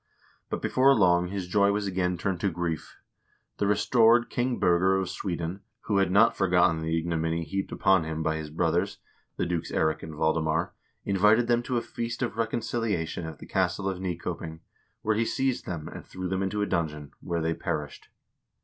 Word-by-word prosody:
But - - -4
before 135 +1 +4
long 90 -3 +4
his 95 -1 -4
joy 100 +2 +3
was 105 0 -1
again 90 -2 0
turned 90 0 -2
to 100 - +1
grief. 85 -2 -4 0.6
The 100 - +1
restored 115 +3 +4
King 125 0 0
Birger 95 +1 +3
of 95 -2 -2
Sweden, 85 +1 -4 0.2
who 100 - 0
had 95 -2 +3
not 105 +4 +5
forgot 90 -2 +4
ten 80 -1 -3
the 80 +1 0
ignominy 80 0 -1
heaped 95 +5 -3
upon 95 -4 +3
him 80 0 -3
by 80 0 0
his 80 -1 -6
brothers, 75 - 0 0.4
the - - 0
dukes 85 -1 -2
Eirik 80 0 +1
and 80 -1 -8
Valdemar, 80 +1 0 0.3
invited 105 +4 +4
them 120 0 +2
to 125 0 -2
a - - +1
feast 115 0 -4
of - - -2
reconciliation 110 -7 -2
at 80 -2 -8
the - - -11
castle 95 +1 0
of 95 -2 -2
Nykoping, 85 -3 -4 0.4
where 110 - +2
he 115 - +2
seized 130 +2 -1
them 80 -4 -4
and - - -8
threw 95 0 -6
them 95 +1 -1
into 100 +2 -1
a - - +1
dungeon, 75 -6 -2
where 85 -2 -2
they 80 0 +1
perished. 75 -5 -4
90 Hz, 190 wpm, -27 LUFS, 80-105 Hz, 0.6 s, not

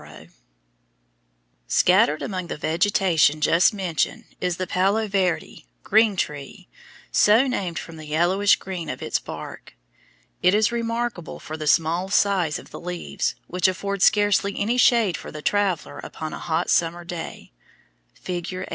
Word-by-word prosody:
OCATILLA] - - -14 1.4
Scattered 150 - +3
among 185 -3 -4
the - - -5
vegetation 165 -2 +2
just 165 +3 +4
mentioned 185 -7 -2 0.2
is 180 -2 -1
the 185 - -2
palo 195 +5 +1
verde 190 -4 -2 0.2
(green 215 0 +3
tree), 145 -5 -5 0.4
so 220 +5 +5
named 190 - -2
from 160 +3 -7
the 155 -1 -10
yellowish 175 +6 +3
green 180 -5 -6
of - - -5
its - - -1
bark. - - -9 0.7
It 180 +3 +4
is 215 +1 +3
remarkable 230 -5 -3
for 155 - -7
the 155 -1 -5
small 165 +4 +2
size 195 -6 +2
of - - -13
the - - -8
leaves, 180 0 -3
which 180 +1 +1
afford 200 +1 -3
scarcely 205 -1 +3
any 225 +5 0
shade 230 -7 +4
for - - -9
the 150 -1 -9
traveller 200 -5 0
upon 155 -1 -7
a - - -6
hot 160 -1 -1
summer 170 +1 +1
day. 170 - -7 0.6
(Fig. 175 -2 -5
84.) 185 0 -5
180 Hz, 150 wpm, -23 LUFS, 165-205 Hz, 1.4 s, so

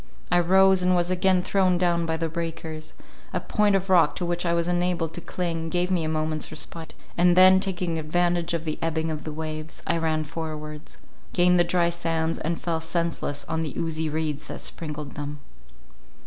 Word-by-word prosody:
I 175 - +5
rose, 190 +2 +5
and 180 0 +3
was 175 0 +1
again 185 0 +3
thrown 185 -2 +2
down 170 -1 +1
by 160 0 0
the 165 0 -1
breakers—a 160 -1 -6
point 210 -2 +2
of 195 0 0
rock 180 -3 +4
to 180 - -2
which 175 0 -1
I 170 - +2
was 170 0 0
enabled 175 -2 0
to 175 - -6
cling, 165 -2 -3
gave 180 +2 0
me 175 -3 +1
a 155 - -1
moment's 155 0 -1
respite; 160 +1 -6 0.2
and 175 0 +5
then, 185 0 +8
taking 180 -4 -1
advantage 175 +2 0
of 165 0 -4
the 155 - -3
ebbing 160 0 -1
of 155 -1 -5
the 155 - -4
waves, 155 0 -6
I 170 - +1
ran 160 -1 0
forwards— 155 -1 -7 0.4
gained 180 0 +4
the - - +6
dry 170 0 +2
sands, 165 -1 -1
and 165 +2 -2
fell 165 -1 -2
senseless 165 -3 -2
on 160 0 -2
the 155 -4 -4
oozy 160 -1 -1
reeds 155 -1 -3
that - - -6
sprinkled 150 -3 -4
them. 145 0 -6
165 Hz, 190 wpm, -25 LUFS, 160-175 Hz, 0.4 s, then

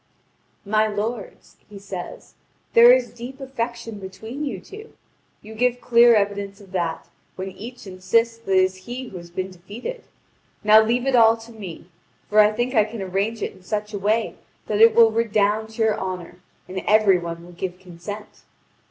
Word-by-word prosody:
"My 215 +1 +2
lords," 215 +1 -5
he 205 - -10
says, 195 -3 -8 0.4
"there 235 +1 +9
is 250 -1 +3
deep 245 +3 -9
affection 235 -4 -5
between 220 +9 -7
you 235 -10 -3
two. 425 - -12 0.5
You 215 +1 -10
give 245 +2 +1
clear 235 -1 +6
evidence 200 -1 -1
of 195 -2 -16
that, 170 -3 -2 0.3
when 190 +1 -5
each 240 +5 -10
insists 215 +5 0
that 230 -4 -7
it 185 -1 +5
is 185 0 0
he 245 +1 -6
who 190 - -8
has 170 -1 -10
been 185 +2 -4
defeated. 205 - -8 0.6
Now 215 +1 +7
leave 240 +3 0
it 270 -1 +2
all 225 -1 +6
to 225 +1 -13
me! 195 -8 -9 0.5
For 215 - +5
I 210 0 +7
think 240 +4 -2
I 220 -4 +5
can 215 -1 -6
arrange 200 +4 -2
it - - -3
in - - -18
such 210 +3 -4
a 205 - -3
way 215 +3 0 0.3
that 210 0 0
it 225 0 +7
will 230 -1 +7
redound 220 -1 +1
to 225 - 0
your 220 -1 +1
honour, 180 -2 -5 0.3
and 190 +1 -4
every 210 -3 +5
one 170 0 -6
will 175 - -13
give 180 +1 -5
consent." 185 +3 -9
215 Hz, 185 wpm, -23 LUFS, 190-230 Hz, 0.6 s, there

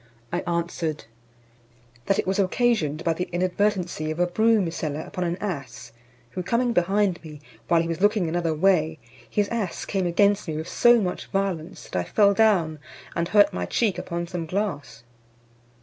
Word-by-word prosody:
"I 175 - +1
answered, 170 -2 -2 1.0
"That 195 - +2
it - - 0
was 190 +2 0
occasioned 185 - +1
by 165 - +2
the 180 +3 -4
inadvertency 180 -2 0
of 155 +2 -4
a 175 - +4
broom 210 0 +2
seller 155 -2 -3
upon 180 - -5
an 170 +1 -2
ass, 150 - -6 0.4
who 185 - -4
coming 235 +6 0
behind 190 0 +1
me, 150 -2 -10 0.3
while 165 -1 +3
he - - -4
was 165 +2 -3
looking 205 -3 +3
another 165 -1 -1
way, 160 -2 +2 0.3
his 205 -1 +1
ass 220 -6 -3
came 190 -3 -1
against 200 +3 +2
me 155 -1 -3
with 160 - -5
so 240 0 +5
much 185 -4 -3
violence, 190 -4 -3
that - - -9
I - - -1
fell 200 -2 +3
down, 190 -8 +2 0.4
and 170 - 0
hurt 205 +2 +4
my 90 0 -3
cheek 210 - 0
upon 170 -1 -4
some 170 -2 -5
glass." 180 - -3
180 Hz, 175 wpm, -24 LUFS, 165-200 Hz, 1.0 s, so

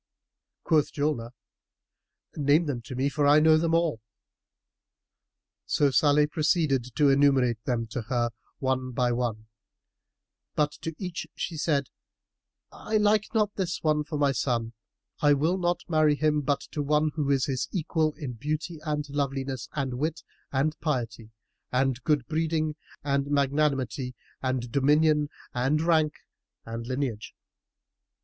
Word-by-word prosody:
Quoth 155 -3 +2
Julnar, 145 -6 -1 1.1
"Name 150 +3 +3
them 135 -5 -3
to 125 - -7
me 130 +2 +1
for 145 0 +1
I 145 +1 +7
know 155 0 +6
them 165 0 +1
all." 165 -9 +1 1.7
So 145 -2 +2
Salih 145 +2 +4
proceeded 150 -6 0
to 145 -2 +4
enumerate 135 -5 +3
them 120 -2 0
to 120 - -3
her, 120 -2 +1 0.3
one 130 -2 -1
by 125 0 +1
one, 120 -3 -2 1.1
but 150 -1 +2
to 165 -1 -4
each 180 -3 -5
she 170 - -4
said, 145 -3 0 0.8
"I 215 - -2
like 210 0 +3
not 210 -2 +2
this 185 -3 -3
one 155 -1 +2
for 150 0 -4
my 145 -1 +3
son; 120 -3 -1 0.5
I 145 -1 +5
will 160 +7 +1
not 175 0 0
marry 155 -3 +3
him 150 0 +1
but 140 0 0
to 150 - -2
one 150 +1 +2
who 150 -3 -1
is 135 -2 +2
his 130 -3 -2
equal 160 -3 0
in 140 -6 -5
beauty 155 +6 -4
and 150 -1 -2
loveliness 135 -2 -3
and 130 -4 -3
wit 155 +2 -2 0.3
and 145 +3 +1
piety 115 -7 -3 0.4
and 130 0 +1
good 150 -5 +1
breeding 155 0 -1 0.3
and 140 -1 0
magnanimity 140 -3 0 0.3
and 130 -2 -2
dominion 150 +2 +3 0.2
and 130 +5 +1
rank 160 -2 +2 0.5
and 115 +1 -6
lineage." 130 -4 -3
145 Hz, 140 wpm, -27 LUFS, 130-155 Hz, 1.7 s, I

